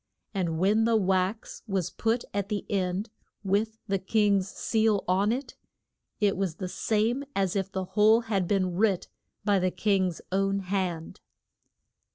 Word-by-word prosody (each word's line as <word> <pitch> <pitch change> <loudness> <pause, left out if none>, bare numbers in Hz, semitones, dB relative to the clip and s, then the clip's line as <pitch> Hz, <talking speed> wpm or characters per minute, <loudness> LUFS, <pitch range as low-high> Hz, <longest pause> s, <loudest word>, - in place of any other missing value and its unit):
And 175 -5 -1
when 205 +6 +3
the 230 0 +3
wax 190 +1 0
was 195 -4 -1
put 230 +2 0
at 200 0 -2
the 210 -2 -2
end 195 +2 -1 0.3
with 210 +3 0
the 195 -1 0
king's 200 -1 +2
seal 220 -2 +1
on 195 +4 +2
it, 255 +2 -4 0.6
it 205 -2 +2
was 185 -4 -2
the 185 - -4
same 225 +7 0
as 195 -1 0
if 195 -1 -1
the 190 -1 -3
whole 210 +4 +4
had 200 -6 -1
been 185 -2 +1
writ 195 -2 +1 0.4
by 205 -2 +3
the 185 0 +1
king's 190 -3 0
own 195 +1 +1
hand. 180 -4 -3
195 Hz, 155 wpm, -28 LUFS, 185-215 Hz, 0.6 s, whole